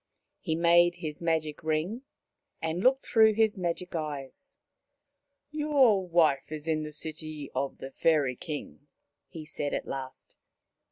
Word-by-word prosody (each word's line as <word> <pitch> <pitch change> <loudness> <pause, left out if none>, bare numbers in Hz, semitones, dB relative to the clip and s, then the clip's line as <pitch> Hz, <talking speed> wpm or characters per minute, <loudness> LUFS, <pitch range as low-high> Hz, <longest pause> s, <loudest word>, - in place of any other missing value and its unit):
He 160 -3 -2
made 170 +1 +5
his 150 -1 -6
magic 160 -2 -1
ring 160 +9 -1 0.6
and 160 +2 -2
looked 265 +4 +3
through 220 -2 +5
his 220 0 +2
magic 180 -1 -3
eyes. 155 - -6 0.5
" - - -55 0.3
Your 275 -11 +3
wife 160 -5 +2
is 155 0 -6
in 155 -1 +1
the 150 0 -6
city 155 -1 -5
of 135 +1 -2
the 135 - -8
Fairy 145 -4 +2
King," 145 0 -7 0.4
he 160 -2 -9
said 145 -1 -3
at - - -3
last. 130 -1 -7
160 Hz, 145 wpm, -29 LUFS, 150-185 Hz, 0.6 s, made